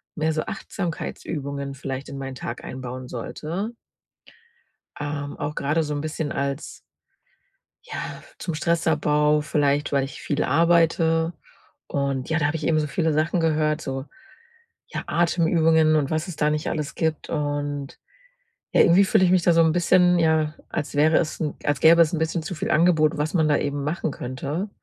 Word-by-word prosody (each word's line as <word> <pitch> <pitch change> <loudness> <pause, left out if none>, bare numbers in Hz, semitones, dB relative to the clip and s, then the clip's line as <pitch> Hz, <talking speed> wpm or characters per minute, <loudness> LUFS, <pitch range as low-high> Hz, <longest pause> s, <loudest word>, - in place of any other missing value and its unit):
mehr 160 0 0
so 155 - 0
Achtsamkeitsübungen 140 -5 -5
vielleicht 135 0 -5
in 140 - -7
meinen 135 -1 -6
Tag 120 -1 -6
einbauen 130 0 -7
sollte 170 - -5 1.2
ähm, 145 -1 -4
auch 145 +1 -4
gerade 150 +4 0
so 150 -1 -3
'n 145 - -2
bisschen 155 -1 -3
als 140 +1 -3 1.0
ja - - -6 0.2
zum 170 - -3
Stressabbau, 150 -2 +2
vielleicht, 145 -1 +1
weil 140 -1 +2
ich 135 +1 -7
viel 145 0 -1
arbeite 165 +1 +3 0.5
und 140 -2 -2
ja, 160 0 +1
da 145 - +2
habe 145 - -2
ich 155 - -5
eben 155 -1 +3
so 150 - -1
viele 160 +1 0
Sachen 155 +3 +1
gehört, 155 -1 +1
so 135 -2 -4 0.8
ja - - -4
Atemübungen 165 -2 +3
und 145 -3 0
was 155 +2 -1
es 175 - -6
da 150 - +2
nicht 150 0 -1
alles 150 -3 -3
gibt 160 -2 -2
und, 145 -2 -3 0.8
ja, - - +6
Irgendwie 185 +4 +6
fühle 190 - +3
ich 180 - +4
mich 185 -2 +4
da 175 - +4
so 165 - +5
'n 160 -1 +4
bisschen, 175 +1 +4
ja, 160 -2 +2 0.2
als 145 - -4
wäre 155 +2 +4
es 155 - -1
'n 155 -3 -2
als 145 -1 0
gäbe 165 +1 +7
es 165 0 +3
'n 160 - 0
bisschen 160 +1 -1
zu 175 - -5
viel 155 - -3
Angebot, 160 -1 +3
was 150 +2 -1
man 160 -4 +3
da 145 -1 +3
eben 145 0 -2
machen 150 +1 -2
könnte 140 +10 -4
155 Hz, 175 wpm, -24 LUFS, 145-165 Hz, 1.2 s, gäbe